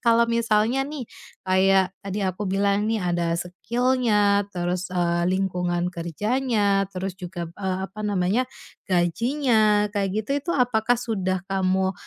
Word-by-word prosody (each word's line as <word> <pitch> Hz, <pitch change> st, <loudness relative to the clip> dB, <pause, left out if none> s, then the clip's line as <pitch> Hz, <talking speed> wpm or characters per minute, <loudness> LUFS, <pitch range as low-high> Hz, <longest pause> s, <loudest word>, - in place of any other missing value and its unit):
kalau 235 Hz, -1 st, +4 dB
misalnya 230 Hz, +2 st, +2 dB
nih 280 Hz, -4 st, -6 dB, 0.4 s
kayak 190 Hz, 0 st, +3 dB
tadi 200 Hz, +1 st, -3 dB
aku 185 Hz, +2 st, -2 dB
bilang 200 Hz, +1 st, +1 dB
nih 225 Hz, -1 st, 0 dB
ada 175 Hz, -2 st, 0 dB
skill-nya, 210 Hz, +1 st, +1 dB
terus, 180 Hz, +1 st, -2 dB
eee, 175 Hz, -1 st, +1 dB
lingkungan 180 Hz, -2 st, 0 dB
kerjanya, 205 Hz, -, 0 dB
terus 185 Hz, 0 st, -4 dB
juga 175 Hz, -2 st, -6 dB
p 170 Hz, -, -18 dB
eee, 190 Hz, -2 st, -2 dB
apa 215 Hz, +2 st, -10 dB
namanya, 205 Hz, +4 st, +1 dB, 0.4 s
gajinya, 215 Hz, -, +2 dB
kayak 200 Hz, -2 st, 0 dB
gitu, -, -, -11 dB
itu 340 Hz, -, -4 dB
apakah 245 Hz, -3 st, +2 dB
sudah 190 Hz, -6 st, -1 dB
kamu, 190 Hz, 0 st, +1 dB
195 Hz, 135 wpm, -24 LUFS, 185-225 Hz, 0.4 s, kalau